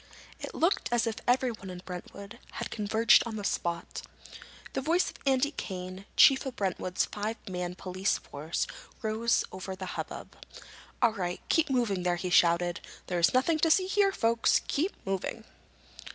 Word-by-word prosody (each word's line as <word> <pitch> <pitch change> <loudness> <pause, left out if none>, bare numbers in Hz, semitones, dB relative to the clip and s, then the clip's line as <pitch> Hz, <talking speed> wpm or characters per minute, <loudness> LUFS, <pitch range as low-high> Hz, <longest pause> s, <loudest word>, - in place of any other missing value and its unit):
It - - -7
looked 345 +5 +1
as 240 -1 +2
if 225 -1 -2
everyone 245 -6 +1
in 180 0 -8
Brentwood 200 +5 -8
had - - -5
converged 220 +2 +4
on 225 - -5
the 210 - -5
spot. 170 -3 -2 0.7
The - - -1
voice 335 +6 +2
of - - -16
Andy 270 +2 +3
Kane, 185 -5 -6
chief 270 -1 +7
of 255 - -5
Brentwood's 185 -3 -1
five 215 +2 -4
man 180 -1 -3
police 185 +2 -1
force, 155 +4 -3 0.4
rose 225 +2 +1
over 190 0 -6
the 185 - -6
hubbub. - - -6 0.7
"All 230 - +5
right, 180 -3 -3
keep 325 -2 +3
moving 235 -8 +1
there!" 175 0 +1
he 180 +1 -4
shouted. 175 0 +4 0.3
"There's 175 -1 +2
nothing 310 +5 +3
to 325 - +3
see 370 +4 +4
here, 395 +1 +3
folks. 230 -8 +2
Keep 340 +8 0
moving!" 195 +3 -3
210 Hz, 160 wpm, -29 LUFS, 180-255 Hz, 0.7 s, chief